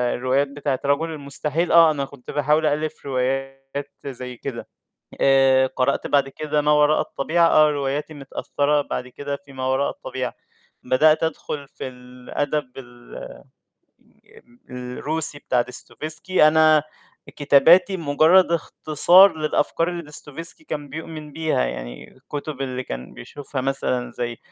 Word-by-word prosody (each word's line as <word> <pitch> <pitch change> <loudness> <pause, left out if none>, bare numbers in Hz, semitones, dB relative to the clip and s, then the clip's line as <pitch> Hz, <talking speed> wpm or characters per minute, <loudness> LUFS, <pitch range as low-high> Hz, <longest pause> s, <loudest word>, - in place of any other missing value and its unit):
الروايات 130 +3 +1
بتاعة 140 -1 -3
رجل 145 +4 +1
المستحيل، 150 +2 -2
آه 165 -2 +7
أنا 140 -2 -2
كنت 135 -2 -11
باحاول 150 +2 +2
أألّف 155 0 -2
روايات 135 +1 -3
زي 125 -2 -7
كده، 130 -4 -6 0.5
آآ 135 -1 +5
قرأت 130 -1 -1
بعد 140 -1 +2
كده 150 +1 -2
ما 150 +1 +1
وراء 150 +1 +4
الطبيعة، 165 +4 +1
آه 155 -1 +5
رواياتي 145 +2 -3
متأثّرة 145 +1 -1
بعد 125 -2 -5
كده 140 +3 -5
في 140 - -15
ما 130 -1 -4
وراء 130 +2 +1
الطبيعة، - - -5 0.5
بدأت 155 +6 +4
أدخل 150 -3 -4
في 130 - -7
الأدب 125 +3 -4
ال 120 -2 -13
آآ - - -9 1.3
الروسي 145 +5 -4
بتاع 125 -3 +1
ديستوفيسكي، 155 +6 0
أنا 155 -1 +5 0.5
كتاباتي 165 +7 +5
مجرّد 165 +3 +4
اختصار 170 +3 +4
للأفكار 155 +2 0
اللي 175 -1 -4
ديستوفيسكي 150 - -5
كان 145 - -5
بيؤمن 155 0 -8
بيها، 160 - 0
يعني - - -7
الكتب 145 -1 -7
اللي 130 -1 -3
كان 60 +1 -7
بيشوفها 135 - -7
مثلًا 130 -2 -2
زي 120 -1 -4
145 Hz, 130 wpm, -22 LUFS, 130-155 Hz, 1.3 s, آه